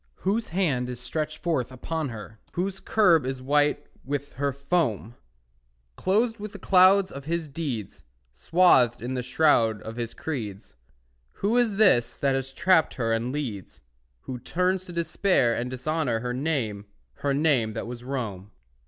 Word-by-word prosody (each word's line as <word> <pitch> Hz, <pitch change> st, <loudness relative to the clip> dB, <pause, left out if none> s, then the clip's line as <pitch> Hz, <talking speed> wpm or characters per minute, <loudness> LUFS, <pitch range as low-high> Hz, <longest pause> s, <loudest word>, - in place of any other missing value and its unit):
Whose 215 Hz, +4 st, +1 dB
hand 150 Hz, -9 st, 0 dB
is 125 Hz, -1 st, -6 dB
stretched 150 Hz, +5 st, -3 dB
forth 155 Hz, -8 st, -1 dB
upon 155 Hz, +4 st, -3 dB
her? 110 Hz, -1 st, -9 dB
Whose 190 Hz, +2 st, -2 dB
curb 175 Hz, -9 st, +4 dB
is 130 Hz, 0 st, -3 dB
white 145 Hz, +3 st, +1 dB, 0.2 s
with 145 Hz, +1 st, -4 dB
her 140 Hz, +2 st, -1 dB
foam? 140 Hz, -, -1 dB, 0.8 s
Clothed 225 Hz, -, +1 dB
with 210 Hz, 0 st, -7 dB
the -, -, -7 dB
cloud 190 Hz, 0 st, +5 dB
of 140 Hz, 0 st, -8 dB
his 165 Hz, 0 st, -2 dB
deeds, 135 Hz, -, -5 dB, 0.3 s
Swathed 130 Hz, -, +4 dB
in 125 Hz, +2 st, -3 dB
the 125 Hz, -, -1 dB
shroud 125 Hz, -5 st, +3 dB
of 115 Hz, +1 st, -7 dB
his 120 Hz, -1 st, -4 dB
creeds, 110 Hz, -11 st, -5 dB, 0.6 s
Who 210 Hz, +4 st, 0 dB
is 240 Hz, -4 st, +2 dB
this 185 Hz, -, +3 dB
that 140 Hz, -1 st, +1 dB
has 135 Hz, 0 st, -2 dB
trapped 165 Hz, +3 st, +3 dB
her 115 Hz, -4 st, 0 dB
and 115 Hz, +2 st, -1 dB
leads, 120 Hz, -, -5 dB, 0.4 s
Who 125 Hz, -1 st, -6 dB
turns 180 Hz, +7 st, 0 dB
to 180 Hz, -, -9 dB
despair 170 Hz, -6 st, +1 dB
and 120 Hz, +1 st, -3 dB
dishonour 130 Hz, -2 st, -1 dB
Her 125 Hz, 0 st, -3 dB
name, 125 Hz, -8 st, -2 dB, 0.3 s
her 140 Hz, -1 st, 0 dB
name 135 Hz, -7 st, +2 dB
that 110 Hz, -, -4 dB
was 120 Hz, 0 st, -7 dB
Rome? 110 Hz, -8 st, -4 dB
140 Hz, 160 wpm, -26 LUFS, 120-170 Hz, 0.8 s, cloud